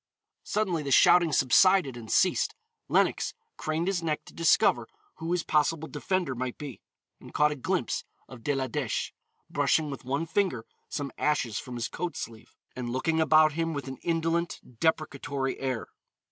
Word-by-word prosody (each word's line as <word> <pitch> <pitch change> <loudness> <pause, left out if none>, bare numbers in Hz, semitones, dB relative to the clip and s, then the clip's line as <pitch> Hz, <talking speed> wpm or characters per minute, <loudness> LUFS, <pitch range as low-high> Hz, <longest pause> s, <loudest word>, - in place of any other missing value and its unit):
_" - - -65 0.4
Suddenly 190 -7 0
the 140 - -4
shouting 170 +5 +6
subsided 145 +2 +4
and 115 -2 -8
ceased. 185 - +2 0.3
Lenox - - +1 0.2
craned 155 +2 -2
his 190 -2 0
neck 155 -2 -2
to - - -14
discover 150 -7 +3 0.3
who 165 +1 -4
his 180 -2 +1
possible 155 +1 +1
defender 155 +1 -1
might 125 0 -4
be, 145 -5 -8 0.4
and - - -14
caught 150 0 +4
a - - -2
glimpse 130 - -1 0.2
of 130 -3 -11
De 145 - 0
la 135 -1 0
Dèche, 130 -2 -2 0.4
brushing 155 -2 +1
with 140 - -7
one 140 +5 -1
finger 165 - 0 0.2
some 140 -2 -4
ashes 130 -8 0
from 125 - -8
his 120 -1 -2
coat 175 -1 -4
sleeve, 115 -1 -8 0.2
and 125 -1 -4
looking 160 +6 0
about 155 0 +5
him 165 +1 -1
with 140 -1 -5
an 130 0 -6
indolent, 165 0 -1 0.2
deprecatory 140 -4 -1
air. 130 -4 -2
150 Hz, 170 wpm, -28 LUFS, 130-165 Hz, 0.4 s, shouting